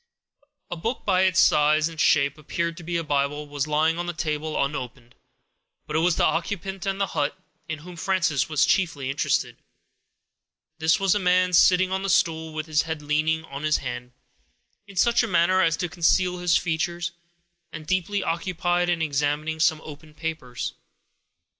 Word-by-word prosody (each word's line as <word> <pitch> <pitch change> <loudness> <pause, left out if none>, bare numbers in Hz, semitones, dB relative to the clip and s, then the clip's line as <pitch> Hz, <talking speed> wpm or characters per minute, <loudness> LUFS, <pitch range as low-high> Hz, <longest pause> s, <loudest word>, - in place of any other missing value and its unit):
A - - -2
book, 225 +10 -3
that - - -33
by 185 -2 +3
its 185 -1 +2
size 150 +1 +4
and 165 -2 -5
shape, 140 0 +3
appeared 170 +2 -3
to 175 - -9
be 170 +1 -2
a 165 - -2
Bible, 145 0 -1
was 145 0 -3
lying 155 +2 +1
on 175 - -3
the 175 - -2
table, 155 -1 -2
unopened. 125 -3 -7 0.7
But 150 - -5
it - - +3
was 170 0 +2
the - - +2
occupant 190 +1 -2
of 195 0 -1
the 195 - +1
hut 145 - -2 0.3
in 160 - -4
whom 175 +4 -11
Frances 185 -6 0
was 155 -3 +3
chiefly 145 -8 0
interested. 140 - -1 1.2
This 160 0 +3
was 195 -2 +3
a 210 - +1
man, 180 -1 +2
sitting 185 +2 +5
on 190 0 -1
the 195 - -3
stool, 165 -4 +1
with 155 0 -4
his 155 -1 +2
head 160 -2 -5
leaning 155 +2 0
on 140 -2 -8
his 155 0 +2
hand, 125 -1 -6 0.7
in 200 - -13
such 235 +6 +3
a - - -1
manner 185 +1 +3
as 165 -3 +2
to 175 - -2
conceal 180 +2 +1
his 175 -1 +3
features, 170 +1 -2 0.6
and 155 -1 -8
deeply 185 +4 -1
occupied 175 +1 -1
in 170 -2 0
examining 150 +2 -1
some 160 -1 +2
open 150 0 -12
papers. 155 -8 -5
160 Hz, 180 wpm, -24 LUFS, 150-180 Hz, 1.2 s, sitting